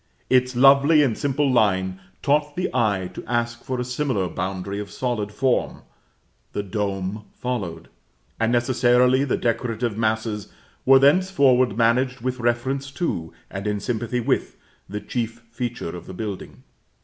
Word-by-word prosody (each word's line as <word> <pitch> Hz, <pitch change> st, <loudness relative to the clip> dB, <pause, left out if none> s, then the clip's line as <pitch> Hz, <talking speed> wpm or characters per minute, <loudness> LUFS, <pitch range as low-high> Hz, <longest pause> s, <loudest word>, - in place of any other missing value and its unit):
Its 125 Hz, 0 st, +3 dB
lovely 140 Hz, +4 st, +6 dB
and 120 Hz, -6 st, +1 dB
simple 145 Hz, +2 st, 0 dB
line 95 Hz, -5 st, +2 dB, 0.2 s
taught 145 Hz, 0 st, +1 dB
the 180 Hz, -, -1 dB
eye 100 Hz, -5 st, +1 dB
to -, -, -7 dB
ask 120 Hz, 0 st, -1 dB
for 130 Hz, -1 st, -3 dB
a -, -, 0 dB
similar 125 Hz, -6 st, -1 dB
boundary 95 Hz, +3 st, -4 dB
of 105 Hz, -1 st, -6 dB
solid 115 Hz, -5 st, -2 dB
form; 130 Hz, +3 st, 0 dB, 0.7 s
the 105 Hz, -, -2 dB
dome 100 Hz, +1 st, -3 dB
followed, 95 Hz, -10 st, -4 dB, 0.5 s
and 115 Hz, +1 st, +2 dB
necessarily 125 Hz, +1 st, +3 dB
the 140 Hz, -, 0 dB
decorative 115 Hz, -1 st, -1 dB
masses 110 Hz, -2 st, -1 dB, 0.4 s
were 135 Hz, 0 st, +9 dB
thenceforward 140 Hz, -, +4 dB
managed 125 Hz, +3 st, +2 dB
with 130 Hz, +1 st, -3 dB
reference 130 Hz, +4 st, -1 dB
to, 85 Hz, -, -3 dB, 0.2 s
and 95 Hz, +2 st, -4 dB
in 105 Hz, 0 st, -1 dB
sympathy 120 Hz, +2 st, -2 dB
with, 115 Hz, -, -1 dB, 0.3 s
the 105 Hz, -, -4 dB
chief 115 Hz, +1 st, -4 dB
feature 120 Hz, -8 st, -4 dB
of 85 Hz, -, -9 dB
the 95 Hz, -, -8 dB
building. 105 Hz, -2 st, -6 dB
120 Hz, 145 wpm, -23 LUFS, 105-130 Hz, 0.7 s, were